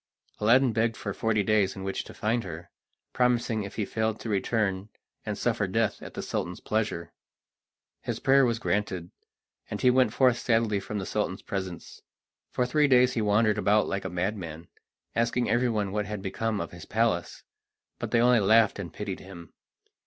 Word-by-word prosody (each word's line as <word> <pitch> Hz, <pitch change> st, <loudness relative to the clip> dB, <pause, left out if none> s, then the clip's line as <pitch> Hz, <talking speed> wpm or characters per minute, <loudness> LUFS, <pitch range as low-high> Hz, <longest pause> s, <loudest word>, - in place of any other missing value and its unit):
Aladdin 120 Hz, +3 st, +4 dB
begged 115 Hz, +1 st, +1 dB
for 100 Hz, -, -4 dB
forty 110 Hz, -1 st, +1 dB
days 100 Hz, -2 st, +2 dB
in 95 Hz, -, -7 dB
which 95 Hz, 0 st, -3 dB
to -, -, -11 dB
find 115 Hz, +2 st, 0 dB
her, 85 Hz, -1 st, -8 dB, 0.4 s
promising 120 Hz, -3 st, +1 dB
if 100 Hz, -1 st, -7 dB
he 110 Hz, -, -1 dB
failed 110 Hz, 0 st, -1 dB
to 115 Hz, -, -5 dB
return 100 Hz, -1 st, 0 dB, 0.4 s
and -, -, -2 dB
suffer -, -, 0 dB
death -, -, 0 dB
at -, -, -10 dB
the -, -, -4 dB
Sultan's 90 Hz, 0 st, -3 dB
pleasure. 105 Hz, -6 st, -2 dB, 0.9 s
His -, -, -4 dB
prayer 135 Hz, +1 st, +5 dB
was 120 Hz, -2 st, +2 dB
granted, 95 Hz, -6 st, -2 dB, 0.6 s
and -, -, -4 dB
he 125 Hz, -, +5 dB
went 125 Hz, -3 st, +3 dB
forth 125 Hz, 0 st, +3 dB
sadly 115 Hz, -3 st, +1 dB
from 105 Hz, +2 st, -5 dB
the 95 Hz, -, -3 dB
Sultan's 105 Hz, -2 st, -2 dB
presence. 95 Hz, -4 st, -6 dB, 0.5 s
For 125 Hz, -, 0 dB
three 145 Hz, +4 st, +3 dB
days 125 Hz, -1 st, +5 dB
he 115 Hz, -, 0 dB
wandered 105 Hz, 0 st, +2 dB
about 105 Hz, +1 st, +3 dB
like 100 Hz, -, -2 dB
a 95 Hz, -, -3 dB
madman, 85 Hz, -3 st, -4 dB, 0.5 s
asking 115 Hz, +1 st, +1 dB
everyone 115 Hz, -5 st, +1 dB
what 105 Hz, 0 st, -2 dB
had 105 Hz, -2 st, -5 dB
become 105 Hz, +2 st, -2 dB
of 85 Hz, -, -4 dB
his 85 Hz, -2 st, -10 dB
palace, 110 Hz, -6 st, -1 dB, 0.6 s
but -, -, -3 dB
they 115 Hz, -, +3 dB
only 125 Hz, -1 st, +5 dB
laughed 110 Hz, +1 st, +4 dB
and 85 Hz, -5 st, -5 dB
pitied 100 Hz, -3 st, -5 dB
him. 85 Hz, -4 st, -12 dB
105 Hz, 180 wpm, -27 LUFS, 95-115 Hz, 0.9 s, prayer